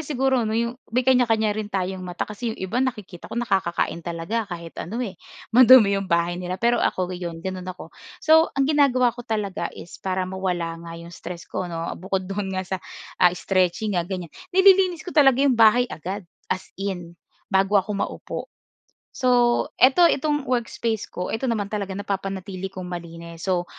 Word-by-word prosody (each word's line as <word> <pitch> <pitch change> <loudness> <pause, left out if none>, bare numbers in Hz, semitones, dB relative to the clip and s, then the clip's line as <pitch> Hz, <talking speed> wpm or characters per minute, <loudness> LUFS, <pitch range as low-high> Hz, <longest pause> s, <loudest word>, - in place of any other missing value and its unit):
siguro 265 -5 0
'no, 220 - 0
'yong 235 +2 -2
may 250 +3 0
kanya-kanya 225 -4 +3
rin 215 0 -4
tayong 190 -1 -2
mata, 180 -1 -4
kasi 215 +3 -5
'yong 225 - -5
iba 230 +7 -1
nakikita 210 -9 -4
ko - - -7
nakakakain 190 -7 0
talaga 170 +7 -3
kahit 170 -2 -7
ano, 215 +7 -5
eh, 200 - -5 0.4
madumi 250 -4 +8
'yong 195 - -6
bahay 170 +1 +1
nila. 180 +1 -3
Pero 235 +2 +2
ako 185 0 0
'yon, 170 -2 -6
gano'n 185 -1 -4
ako. 185 - -8 0.2
So 320 +1 +5
ang 275 - +3
ginagawa 265 -5 +3
ko 240 - -9
talaga 210 -7 -2
is 175 - -11
para 185 -1 -1
mawala 180 -3 -3
nga 165 0 -8
'yong 170 +1 -10
stress 170 0 -8
ko 180 - -4
'no. 165 0 -4
Bukod 190 0 -2
do'n 195 +1 -3
nga 185 - -2
sa 190 - -3 0.4
ah, 180 - +8
stretching 190 +2 0
nga 175 -1 -1
ganyan, 180 -4 -5 0.2
nililinis 380 -3 +5
ko 360 - -6
talaga 275 -3 +5
'yong 275 - +4
bahay 230 +1 +5
agad, 190 +4 -5 0.2
as 185 - -2 0.2
in, 175 -4 -4 0.4
bago 195 +2 +3
ako 200 +2 +1
maupo. 200 - -4 0.8
So, 245 -2 +3 0.2
ito, 270 +7 +6
itong 295 -3 +2
workspace 235 -3 -2
ko, 180 - -4
ito 240 +4 -1
naman 210 -3 -2
talaga 200 -2 -3
napapanatili 195 -1 -4
kong 185 -1 -8
malinis. 170 0 -7
So, 180 -2 +1
195 Hz, 180 wpm, -24 LUFS, 180-240 Hz, 0.8 s, madumi